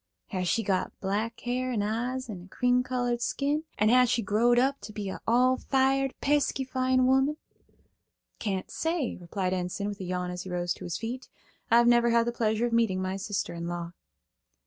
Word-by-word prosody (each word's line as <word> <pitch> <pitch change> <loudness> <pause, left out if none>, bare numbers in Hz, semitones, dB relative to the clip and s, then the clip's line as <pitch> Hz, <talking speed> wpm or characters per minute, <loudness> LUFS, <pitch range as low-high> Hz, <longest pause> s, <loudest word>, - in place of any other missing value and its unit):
Has 185 -3 -2
she 225 - +1
got 195 -2 -1
black 210 +4 -2
hair 255 +1 -1
and 215 -4 0
eyes 245 +4 -2
and 185 -6 -7
a - - -18
cream 250 +4 +2
colored 245 -1 -1
skin, 290 +5 0
and 215 +1 +3
has 250 0 +5
she 235 -1 +1
growed 230 +5 +3
up 270 +3 +2
to - - -8
be 205 -2 -4
a - - -6
all 250 +3 +4
fired 270 0 +1
pesky 285 -1 +1
fine 255 0 +1
woman?" 265 +3 +3 1.0
"Can't 195 -4 -3
say," 325 -5 -1
replied 185 +1 -3
Enson, 185 +2 -2
with 205 - -6
a - - -5
yawn 180 0 -2
as 180 0 -5
he 185 - -8
rose 175 -1 -1
to - - -10
his 175 0 -3
feet. 245 +3 -5 0.4
"I've 235 +1 +6
never 240 0 +5
had 230 0 +3
the 240 - 0
pleasure 225 -1 0
of 240 - -2
meeting 225 -5 +2
my 185 0 -2
sister 195 -1 -3
in 170 0 -5
law." 170 -1 -4
230 Hz, 200 wpm, -28 LUFS, 190-255 Hz, 1.0 s, I've